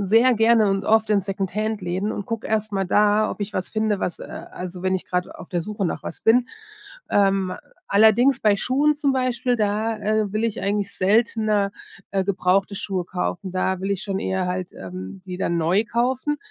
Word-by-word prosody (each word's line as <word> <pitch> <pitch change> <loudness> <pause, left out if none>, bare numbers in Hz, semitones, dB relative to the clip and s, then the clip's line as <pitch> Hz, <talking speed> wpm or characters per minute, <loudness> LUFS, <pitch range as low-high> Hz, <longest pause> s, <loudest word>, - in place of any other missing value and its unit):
sehr 225 +6 +4
gerne 225 -1 +4
und 195 0 -1
oft 220 0 +3
in 205 -2 +3
Second-Hand-Läden 195 0 -2
und 205 - -5
gucke 230 -1 -4
erstmal 215 -3 -1
da, 210 +2 +3
ob - - -7
ich 205 0 -4
was 185 - -2
finde, 215 -2 0
was, 180 - -3
äh - - -8 0.3
also 180 0 -7
wenn 185 0 +1
ich 185 - -3
grad 180 0 -1
auf 165 - -11
der 175 -2 -1
Suche 205 -1 -3
nach - - -4
was - - -7
bin. 245 +2 +4 0.6
Ähm, 195 -2 +2 0.3
allerdings 220 +6 +5
bei 210 -2 +4
Schuhen 275 +8 +2
zum 290 -2 +1
Beispiel, 255 -1 0
da, 215 +1 0
äh, 215 0 0
will 215 - 0
ich 230 -3 -1
eigentlich 200 0 -1
seltener, 210 0 +2 0.4
äh, 195 0 +1
gebrauchte 195 +1 +1
Schuhe 190 -3 -3
kaufen. 180 +1 -3
Da 185 0 0
will 195 +1 -2
ich 200 0 -1
schon 195 -2 -2
eher 190 -2 -1
halt, 180 0 -4
ähm, 95 - -8
die 180 -1 -6
dann 170 -2 0
neu 175 +6 +2
kaufen. 260 +5 0
205 Hz, 195 wpm, -23 LUFS, 190-220 Hz, 0.6 s, allerdings